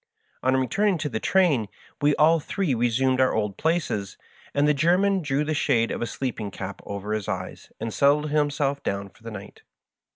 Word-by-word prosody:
On 130 Hz, +1 st, +2 dB
returning 190 Hz, -, +1 dB
to 150 Hz, -1 st, -3 dB
the 110 Hz, -, -3 dB
train 155 Hz, -, +2 dB, 0.3 s
we 145 Hz, 0 st, +3 dB
all 160 Hz, +2 st, +5 dB
three 175 Hz, 0 st, -1 dB
resumed 125 Hz, +2 st, +2 dB
our 130 Hz, -, +3 dB
old 105 Hz, -3 st, -1 dB
places, 155 Hz, -, -1 dB, 0.3 s
and 145 Hz, +1 st, +2 dB
the 150 Hz, -, +4 dB
German 180 Hz, +6 st, +2 dB
drew 145 Hz, -1 st, 0 dB
the 155 Hz, +1 st, -1 dB
shade 125 Hz, -6 st, +1 dB
of -, -, -4 dB
a 120 Hz, -, -1 dB
sleeping 115 Hz, -6 st, -4 dB
cap 100 Hz, 0 st, -7 dB
over 100 Hz, +1 st, -4 dB
his 110 Hz, -2 st, -3 dB
eyes 95 Hz, -3 st, -5 dB
and 115 Hz, -1 st, -4 dB
settled 145 Hz, +2 st, +3 dB
himself 145 Hz, -2 st, 0 dB
down 100 Hz, 0 st, -3 dB
for -, -, -25 dB
the 115 Hz, -, -7 dB
night. 105 Hz, -3 st, -10 dB
135 Hz, 190 wpm, -25 LUFS, 110-150 Hz, 0.3 s, all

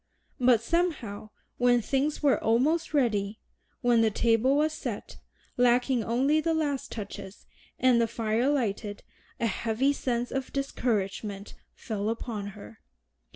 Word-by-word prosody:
But 245 Hz, -3 st, +4 dB
somehow 265 Hz, -, -1 dB, 0.3 s
when 245 Hz, 0 st, +4 dB
things 280 Hz, +5 st, -1 dB
were 280 Hz, -2 st, +3 dB
almost 285 Hz, +9 st, +2 dB
ready, 220 Hz, -7 st, 0 dB, 0.4 s
when 240 Hz, -3 st, +4 dB
the 225 Hz, -, +4 dB
table 230 Hz, +5 st, +2 dB
was 305 Hz, +1 st, +2 dB
set, -, -, -6 dB, 0.4 s
lacking 245 Hz, 0 st, +3 dB
only 270 Hz, +8 st, +2 dB
the 330 Hz, 0 st, 0 dB
last 290 Hz, -4 st, -1 dB
touches, 200 Hz, -2 st, -8 dB, 0.3 s
and 250 Hz, -2 st, +4 dB
the 230 Hz, -, +2 dB
fire 230 Hz, +3 st, 0 dB
lighted, 215 Hz, -6 st, -2 dB, 0.4 s
a -, -, 0 dB
heavy 230 Hz, +6 st, +1 dB
sense 245 Hz, -3 st, -2 dB
of 265 Hz, -1 st, -3 dB
discouragement 210 Hz, -6 st, -2 dB, 0.2 s
fell 210 Hz, -1 st, -3 dB
upon 225 Hz, -3 st, -4 dB
her. 105 Hz, +2 st, -12 dB
240 Hz, 130 wpm, -28 LUFS, 220-275 Hz, 0.4 s, But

